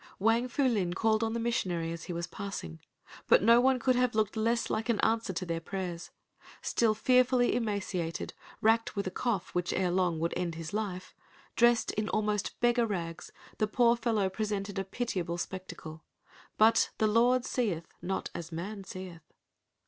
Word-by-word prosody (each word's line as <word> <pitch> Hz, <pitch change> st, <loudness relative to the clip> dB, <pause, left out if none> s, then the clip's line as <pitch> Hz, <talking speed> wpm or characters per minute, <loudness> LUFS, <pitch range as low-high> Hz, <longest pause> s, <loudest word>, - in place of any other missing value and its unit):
Wang 225 Hz, +4 st, +2 dB
Fu 280 Hz, +3 st, -1 dB
Lin 200 Hz, -9 st, +1 dB
called 220 Hz, +1 st, +2 dB
on 225 Hz, 0 st, -1 dB
the 235 Hz, -, -1 dB
missionary 180 Hz, -8 st, -1 dB
as 170 Hz, 0 st, -6 dB
he -, -, -6 dB
was 170 Hz, 0 st, -3 dB
passing. 175 Hz, -, -6 dB, 0.5 s
But -, -, +5 dB
no 235 Hz, +2 st, +7 dB
one 260 Hz, 0 st, +4 dB
could 255 Hz, +1 st, +2 dB
have 250 Hz, -2 st, +1 dB
looked 215 Hz, -1 st, +1 dB
less 230 Hz, +2 st, +1 dB
like 220 Hz, +2 st, -2 dB
an 230 Hz, -, +2 dB
answer 225 Hz, -3 st, +1 dB
to 185 Hz, 0 st, -3 dB
their 165 Hz, -1 st, -2 dB
prayers. 175 Hz, -1 st, -5 dB, 0.5 s
Still 225 Hz, -2 st, +2 dB
fearfully 250 Hz, +1 st, +3 dB
emaciated, 195 Hz, -7 st, -2 dB, 0.3 s
racked 225 Hz, +1 st, +2 dB
with 200 Hz, -, -1 dB
a 185 Hz, -, -3 dB
cough 205 Hz, -2 st, -2 dB
which 180 Hz, 0 st, 0 dB
ere 180 Hz, -1 st, +1 dB
long 180 Hz, -2 st, +1 dB
would 165 Hz, +1 st, -1 dB
end 170 Hz, -2 st, -2 dB
his 165 Hz, +1 st, -7 dB
life, 200 Hz, -4 st, -3 dB, 0.4 s
dressed 235 Hz, -1 st, +4 dB
in 215 Hz, 0 st, -2 dB
almost 210 Hz, -1 st, -1 dB
beggar 240 Hz, -1 st, +3 dB
rags, 170 Hz, -5 st, -4 dB, 0.3 s
the 215 Hz, -, +2 dB
poor 235 Hz, +2 st, +4 dB
fellow 225 Hz, -4 st, +1 dB
presented 200 Hz, 0 st, -3 dB
a -, -, -1 dB
pitiable 190 Hz, -5 st, -3 dB
spectacle. 170 Hz, -3 st, -7 dB, 0.5 s
But 225 Hz, +1 st, +5 dB
"the 220 Hz, -, +2 dB
Lord 240 Hz, +4 st, +3 dB
seeth 195 Hz, -10 st, -1 dB, 0.2 s
not 190 Hz, +1 st, -3 dB
as 170 Hz, 0 st, -6 dB
man 195 Hz, +5 st, -5 dB
seeth." 185 Hz, -3 st, -8 dB
210 Hz, 175 wpm, -30 LUFS, 180-230 Hz, 0.5 s, no